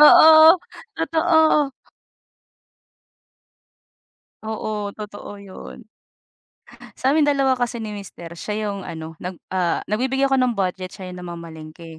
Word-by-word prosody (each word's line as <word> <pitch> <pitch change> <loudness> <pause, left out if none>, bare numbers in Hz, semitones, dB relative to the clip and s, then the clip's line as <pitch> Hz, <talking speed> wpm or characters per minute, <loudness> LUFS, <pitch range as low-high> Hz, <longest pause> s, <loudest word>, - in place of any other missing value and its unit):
Oo, 315 +2 +9 0.4
totoo. 320 -3 +2 2.7
Oo, 215 -1 -4
totoo 205 -1 -9
'yon. 200 +3 -11 1.1
Sa'min 290 +3 +2
dalawa 275 -3 +2
kasi 240 -1 -2
ni 215 - -5
mister 195 -5 -9
siya 210 +2 -3
'yong 200 -2 -6
ano, 160 -1 -8
nag, 180 +1 -6 0.2
ah, 180 -2 0
nagbibigay 265 +5 0
ako 270 - +3
ng 250 -2 +2
budget 185 -2 -3
siya 185 -2 -8
yung 180 0 -9
namamalengke. 165 -1 -10
210 Hz, 110 wpm, -21 LUFS, 180-270 Hz, 2.7 s, Oo